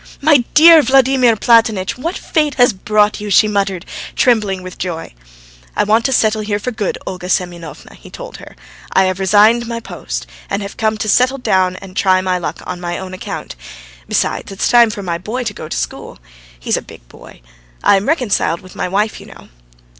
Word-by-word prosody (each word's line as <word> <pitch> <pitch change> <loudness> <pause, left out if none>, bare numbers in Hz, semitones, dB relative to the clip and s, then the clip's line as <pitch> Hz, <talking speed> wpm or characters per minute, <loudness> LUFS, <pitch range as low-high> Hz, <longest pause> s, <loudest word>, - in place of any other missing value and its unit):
"My 295 0 +5 0.2
dear 325 +1 +8
Vladimir 260 -2 +3
Platonitch! 220 -4 +2
What 330 +9 -4
fate 300 -4 -1
has 245 -3 +4
brought 210 +2 +1
you?" 210 - -5
she 205 +2 +5
muttered, 195 -3 -1 0.3
trembling 210 -6 +1
with 185 0 -10
joy. 170 - -5 0.6
"I - - +2
want 220 +3 +2
to 265 - +1
settle 220 -3 +2
here 210 -1 -2
for 230 +5 -4
good, 215 -4 -3
Olga 180 -1 -6
Semyonovna," 175 -3 -4
he - - -15
told - - -9
her. - - -13 0.4
"I 190 - +4
have 185 0 -1
resigned 215 +5 +4
my 230 0 -4
post, - - -6 0.2
and 200 +1 -2
have 200 - -8
come 220 -1 0
to 215 - -4
settle 250 +5 +3
down 185 -7 +1
and 185 0 -11
try 185 -1 +3
my 185 -1 -1
luck 175 - -5
on 180 -1 -6
my 175 0 -3
own 185 -1 -7
account. 185 - -7 0.5
Besides, - - -1
it's 195 - -1
time 235 -1 +6
for 210 -2 -6
my 170 -2 -3
boy 225 +7 -4
to 225 -3 -4
go 155 - -8
to - - -3
school. - - -5 0.4
He's - - -1
a - - -4
big - - -15
boy. - - -16 0.4
I - - +5
am 195 +1 -1
reconciled 220 - 0
with 185 - -15
my - - -2
wife, 205 +4 -1
you - - -13
know." - - -15
210 Hz, 200 wpm, -16 LUFS, 185-235 Hz, 0.6 s, dear